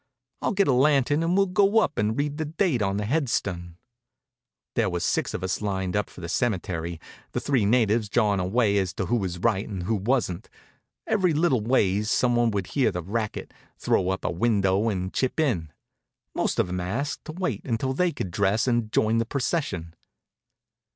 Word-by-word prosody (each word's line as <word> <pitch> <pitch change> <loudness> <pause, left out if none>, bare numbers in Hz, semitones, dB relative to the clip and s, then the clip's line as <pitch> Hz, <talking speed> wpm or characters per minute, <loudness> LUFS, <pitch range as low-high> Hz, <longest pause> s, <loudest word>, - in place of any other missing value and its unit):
I'll - - 0
get 200 0 +2
a 135 - +4
lantern 140 +2 +3
and 170 +3 +1
we'll 195 - +5
go 195 +3 +2
up 185 -9 +2
and 105 +2 0
read 145 0 -1
the 155 - -1
date 155 - 0
on 100 -1 0
the 105 - -1
headstun." 100 - -1 1.0
There - - +1
was - - -2
six - - 0
of - - -5
us 95 +2 -2
lined 95 -3 -2
up 105 -2 0
for - - -12
the 85 - -5
cemetery, 90 -6 -2 0.3
the - - 0
three 130 -7 +1
natives 110 -2 +2
jawin' 105 -4 +2
away 100 +2 +2
as 95 -3 -2
to - - -2
who 120 - 0
was 95 -5 -3
right 100 +1 0
and 95 -4 -4
who 110 - -1
wasn't. 105 -3 -1 0.6
Every 185 -6 +2
little 150 -7 +2
ways 105 -3 +1
some 120 +1 +2
one 120 -1 +3
would 100 -3 -2
hear 130 -6 +3
the 90 -2 -4
racket, 110 +4 -4 0.2
throw 95 - +1
up 95 - -2
a - - +1
window, 100 +1 +2
and 95 -2 -3
chip 130 +4 -1
in. 95 - 0 0.6
Most - - -1
of - - +2
'em 90 +1 -3
asked 130 - -3
us 155 - -6
to - - -10
wait 140 - -2
until 130 +2 -1
they 180 +5 +1
could 95 - -5
dress 100 +4 +1
and 120 -3 0
join 110 +1 +2
the 115 - 0
procession. 120 - -2
110 Hz, 200 wpm, -25 LUFS, 95-135 Hz, 1.0 s, we'll